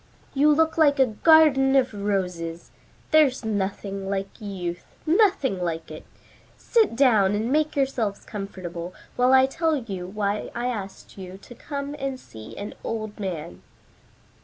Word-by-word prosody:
"You 290 +2 +4
look 320 +2 +2
like 290 -2 +5
a 265 - +5
garden 270 +2 +5
of 260 -4 +3
roses. 180 -5 -3 0.4
There's 280 -6 +4
nothing 195 -1 -3
like 195 +3 -4
youth; 180 -4 -5 0.2
nothing 320 - +2
like 165 -2 -3
it. - - -9 0.5
Sit 445 - +2
down 220 -7 +4
and 220 +4 -1
make 305 +1 +1
yourselves 245 -7 -1
comfortable 185 -4 -7 0.2
while 250 +1 +3
I 265 0 +7
tell 320 +4 0
you 195 -9 -5
why 205 +1 -2
I 240 - -2
asked 205 -5 -6
you 185 0 -8
to - - -12
come 280 +2 -6
and 270 -1 -3
see 110 - -12
an 205 +1 -6
old 215 -2 -5
man." 165 - -5
215 Hz, 145 wpm, -24 LUFS, 195-275 Hz, 0.5 s, I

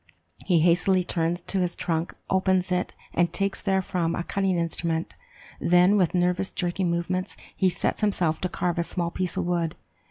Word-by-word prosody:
He 175 -4 +4
hastily 180 +2 +3
turns 170 0 -1
to 195 - -2
his 180 -1 0
trunk, 165 -1 -2
opens 190 -1 +1
it, 180 0 -1 0.2
and 175 0 +2
takes 195 0 -1
therefrom 185 -4 0
a 175 - -2
cutting 195 0 0
instrument; 165 0 -2 0.5
then, 180 +3 +4
with 185 -3 +2
nervous 180 +2 +1
jerking 180 0 -1
movements, 185 +2 -2 0.2
he 190 - +3
sets 180 - -1
himself 180 -6 +1
to 185 - -1
carve 175 -1 -1
a - - +2
small 170 0 -2
piece 185 0 -3
of - - 0
wood. 170 -2 -1
180 Hz, 170 wpm, -26 LUFS, 170-185 Hz, 0.5 s, He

